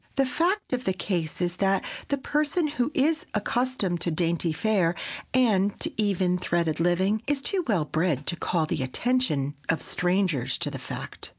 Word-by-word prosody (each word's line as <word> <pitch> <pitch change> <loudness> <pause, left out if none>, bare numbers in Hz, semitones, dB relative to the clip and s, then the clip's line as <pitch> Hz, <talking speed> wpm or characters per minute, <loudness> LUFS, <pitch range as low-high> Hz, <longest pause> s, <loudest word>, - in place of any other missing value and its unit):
The 275 - +3
fact 345 +7 0
of 250 0 -1
the 190 - +2
case 175 -4 -2
is 175 0 -1
that 195 -1 +2 0.2
the 280 - 0
person 300 +4 0
who 285 -3 0
is 315 +5 +2
accustomed 210 -5 0
to - - +1
dainty 170 0 +1
fare, 175 0 +1 0.4
and 205 -6 +3
to - - -2
even 185 -3 +1
threaded 170 -3 0
living, 185 +5 +2
is 290 -1 +2
too 370 +6 0
well 190 -9 +2
bred 155 -2 0
to - - 0
call 165 -1 0
the 155 - -2
attention 145 - 0 0.2
of 165 - +2
strangers 180 -9 0
to - - -2
the - - -5
fact. - - -7
190 Hz, 175 wpm, -26 LUFS, 170-255 Hz, 0.4 s, The